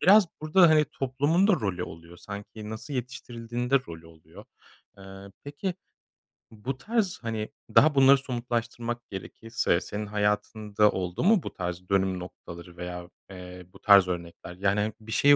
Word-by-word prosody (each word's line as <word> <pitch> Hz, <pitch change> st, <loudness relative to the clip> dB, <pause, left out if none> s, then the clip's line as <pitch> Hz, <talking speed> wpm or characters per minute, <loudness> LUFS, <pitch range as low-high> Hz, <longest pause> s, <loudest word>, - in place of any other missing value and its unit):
biraz 200 Hz, +1 st, +7 dB
burada, 165 Hz, +3 st, +5 dB
hani, 155 Hz, -1 st, +5 dB
toplumun 145 Hz, +7 st, +1 dB
da -, -, +6 dB
rolü 100 Hz, -, -1 dB
oluyor, 85 Hz, +1 st, -10 dB
sanki 105 Hz, +3 st, -8 dB
nasıl 110 Hz, +6 st, -6 dB
yetiştirildiğinin 120 Hz, -1 st, -5 dB
de 140 Hz, -, +6 dB
rolü 80 Hz, 0 st, -9 dB
oluyor. 80 Hz, -1 st, -15 dB, 0.5 s
Eee, 95 Hz, -, -12 dB, 0.4 s
peki, 145 Hz, +6 st, -4 dB, 0.8 s
bu 125 Hz, +5 st, -5 dB
tarz, 215 Hz, -, -1 dB
hani, 110 Hz, -2 st, -3 dB, 0.3 s
daha 150 Hz, -1 st, +6 dB
bunları 135 Hz, 0 st, +7 dB
somutlaştırmak 120 Hz, -2 st, -3 dB
gerekirse 95 Hz, -1 st, -2 dB
senin 105 Hz, +1 st, -5 dB
hayatında 105 Hz, 0 st, +1 dB
oldu 90 Hz, -, -3 dB
mu 200 Hz, -3 st, +4 dB
bu -, -, -6 dB
tarz 90 Hz, 0 st, -5 dB
dönüm 95 Hz, -1 st, +1 dB
noktaları 85 Hz, -1 st, -10 dB
veya, 90 Hz, 0 st, -6 dB, 0.2 s
eee, 90 Hz, -1 st, -10 dB
bu -, -, -15 dB
tarz 100 Hz, -3 st, +7 dB
örnekler? 85 Hz, 0 st, -6 dB
Yani, 100 Hz, +2 st, +1 dB
he 105 Hz, 0 st, -1 dB
bir 110 Hz, 0 st, -11 dB
şeyi 145 Hz, +5 st, +6 dB
110 Hz, 150 wpm, -27 LUFS, 90-135 Hz, 0.8 s, biraz